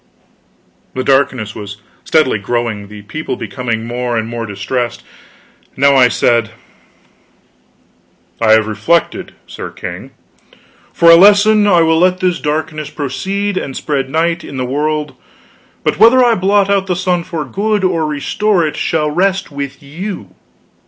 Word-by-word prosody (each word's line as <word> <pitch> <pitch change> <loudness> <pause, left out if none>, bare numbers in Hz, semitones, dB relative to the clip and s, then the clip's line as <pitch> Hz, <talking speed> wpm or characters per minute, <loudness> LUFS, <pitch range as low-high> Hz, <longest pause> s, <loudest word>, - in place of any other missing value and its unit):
The 130 - -2
darkness 130 -6 +1
was 105 -1 -8 0.3
steadily 150 -9 +2
growing, 110 -1 -3
the 105 0 -11
people 130 +4 -5
becoming 115 +1 -4
more 120 0 -2
and 110 0 -2
more 115 -1 -5
distressed. 110 +5 -3
I - - -25
now 135 -2 +5
said: 115 -2 +1 1.9
"I 110 -1 +5
have 110 -1 +4
reflected, 110 +11 -1
Sir - - -8
King. - - -8 0.8
For 170 0 +5
a - - +10
lesson, 205 +3 +5
I 175 -4 +4
will 160 0 +2
let 185 +1 +2
this 180 -2 0
darkness 155 0 -3
proceed, 190 +9 -3
and 135 -6 -4
spread 135 -3 -2
night 165 +3 0
in 140 - -8
the 130 - -2
world; 150 +3 -2 0.7
but - - -1
whether 250 +3 +6
I 240 - +4
blot 200 0 +2
out 200 -1 +1
the 180 - 0
sun 180 -1 0
for 165 -3 -5
good, 210 0 -1
or 170 -4 +1
restore 175 +5 0
it, 150 - -3
shall 150 -2 0
rest 190 +2 0
with 140 +1 -6
you. 180 +8 -7
150 Hz, 145 wpm, -15 LUFS, 125-185 Hz, 1.9 s, a